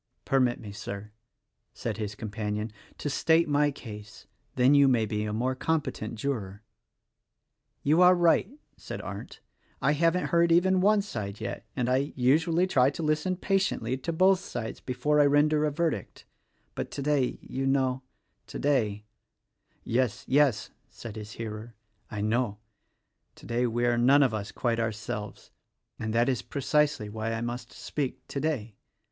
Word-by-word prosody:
"Permit 130 -3 +2
me, 105 -3 -8
Sir," 100 0 -7 0.6
said - - -4
his 105 -2 -4
companion, 105 0 -4 0.3
"to - - -4
state 160 +3 +3
my 145 0 +3
case, 105 -6 -10 0.2
— - - -43
then 130 +2 +5
you 140 -1 +6
may 120 -4 +3
be 105 -1 -2
a 105 - -3
more 125 +5 0
competent 130 -6 -2
juror." 110 -5 -4 1.2
"You 155 +5 +4
are 180 0 +8
right," 175 +2 +3 0.3
said - - -7
Arndt, - - -8 0.4
"I - - +2
haven't 165 +4 +2
heard 170 0 +3
even 185 +2 +4
one 205 +1 +4
side 105 - -5
yet; 120 +2 -5
and 125 -2 0
I, 130 +3 +1
usually, 160 +7 +3
try 135 -8 +3
to 145 +3 -5
listen 155 +4 +1
patiently 185 - 0
to 150 +6 -3
both 185 +3 +4
sides 120 -11 -6
before 150 +4 +1
I 145 - +5
render 150 +1 +3
a 150 - 0
verdict; 150 - -2 0.5
but, - - -4
today, 140 -2 0
you 135 +1 -3
know 130 -1 +1 0.2
— - - -47
today—" 110 -8 0 0.8
"Yes, 125 +1 0
yes!" 135 -4 +2 0.2
said 115 -3 -9
his 105 -1 -8
hearer, 110 0 -7 0.3
"I 105 - -4
know. 110 0 0 0.8
Today, 120 +1 -1
we 120 +1 0
are 120 -1 +2
none 140 +4 +6
of 130 -4 +1
us 105 -2 -4
quite 115 -2 -1
ourselves, 110 -1 -4 0.5
and 110 0 -3
that 115 +2 +2
is 130 -4 0
precisely 145 -4 0
why 110 +2 -3
I 115 - -3
must 120 0 -5
speak 140 -4 -4
today. 140 -7 -2
125 Hz, 155 wpm, -28 LUFS, 110-150 Hz, 1.2 s, are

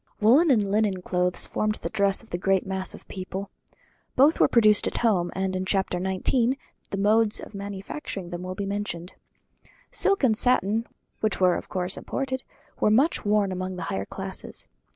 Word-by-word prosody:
Woollen 265 +11 +5
and 210 -7 +3
linen 205 -3 +1
clothes 180 0 +1
formed 215 0 -1
the - - -5
dress 200 0 +1
of 225 - -20
the 175 - -2
great 195 0 +2
mass 190 0 -2
of - - -12
the - - -13
people. 190 +1 -5 0.6
Both 285 +5 +5
were - - +6
produced 215 -3 +4
at - - -3
home; 180 -6 +2
and 190 0 -1
in 185 - -1
chapter 190 -2 0
xix. 230 +7 +1 0.3
the 195 - -3
modes 215 +2 +3
of - - -10
manufacturing 195 -1 -6
them 175 0 -5
will 185 0 -5
be 200 - -3
mentioned. 195 -3 -4 0.8
Silk 395 -5 +1
and 230 -5 +4
satin, 225 -2 +2 0.3
which 215 -1 0
were 185 -1 +5
of - - -6
course 185 0 -2
imported, 260 -1 -3 0.4
were - - +3
much 265 +10 +3
worn 205 -1 +2
among 185 0 -4
the 180 - -5
higher 95 0 -2
classes. - - -5
200 Hz, 185 wpm, -26 LUFS, 185-220 Hz, 0.8 s, were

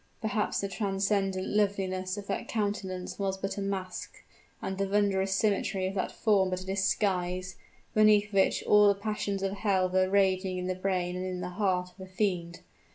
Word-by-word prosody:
Perhaps 220 -1 -1
the 200 - -1
transcendent 195 -1 0
loveliness 195 -2 0
of 205 - -6
that - - -3
countenance 200 -4 -3
was 195 -1 -1
but 195 +1 -3
a - - -2
mask 190 -2 -5 0.4
and 190 0 -4
the 195 - +1
wondrous 195 -1 +1
symmetry 195 -2 +1
of 190 - -2
that 190 - -2
form 200 -4 +2
but 185 0 -2
a - - -9
disguise, 190 -2 0 0.4
beneath 210 -1 +4
which 195 -1 +3
all 210 0 +6
the 200 -1 +3
passions 200 -2 -2
of 195 - 0
hell 195 -2 +1
were 185 0 +2
raging 190 -1 +2
in 180 - -3
the 185 - 0
brain 185 -1 -1
and 185 0 -3
in 185 -1 -4
the 180 0 -4
heart 180 -2 0
of - - -28
a 190 - -9
fiend. 180 -3 -2
195 Hz, 185 wpm, -29 LUFS, 185-200 Hz, 0.4 s, all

